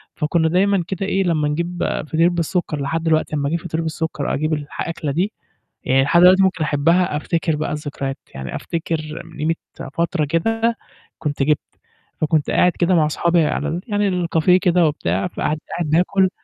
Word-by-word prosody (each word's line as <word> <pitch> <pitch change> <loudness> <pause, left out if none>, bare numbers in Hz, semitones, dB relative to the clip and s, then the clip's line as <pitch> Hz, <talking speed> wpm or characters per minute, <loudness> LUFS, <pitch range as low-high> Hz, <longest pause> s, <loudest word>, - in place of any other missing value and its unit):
فكنا 160 +1 +1
دايمًا 195 +1 +2
كده 195 0 -3
إيه، 195 0 +1
لمّا 160 -4 +1
نجيب 170 +4 -2 0.2
فطير 165 +3 +3
بالسُكّر 170 -3 -1
لحد 160 +4 -2
دلوقتي 155 -1 +1
لمّا 140 -1 0
أجيب 170 - -1
فطير 165 -1 -3
بالسُكّر 160 -2 -3
وأجيب 155 +2 0
الح 145 -1 -4
الأكلة 165 -3 -3
دي، 185 +9 -1 0.5
يعني 135 +1 +3
لحد 170 +5 +4
دلوقتي 185 +2 +7
ممكن 185 -4 +1
أحبها، 155 +2 +2
أفتكر 165 0 -1
بقى 150 - -3
الذكريات، 145 -2 -4 0.2
يعني 65 -1 -6
أفتكر 160 -2 -4
من - - -14
قيمة 155 +2 0 0.4
فترة 170 -1 0
كده 225 +9 0 0.4
كنت 145 -2 -1
جِبت، 150 +1 +2 0.6
فكنت 155 -1 +1
قاعد 180 - +4
كده 175 +1 +3
مع 155 - +4
أصحابي 170 +1 +2
على 150 - -1
ال 170 +3 -3
يعني 200 -5 0
الcafe 165 +2 +2
كده 180 -3 +3
وبتاع، 95 - -1
فقاعد 155 - -2
قاعد 170 -3 -2
باكل، 185 +3 +3
165 Hz, 175 wpm, -20 LUFS, 150-180 Hz, 0.6 s, دلوقتي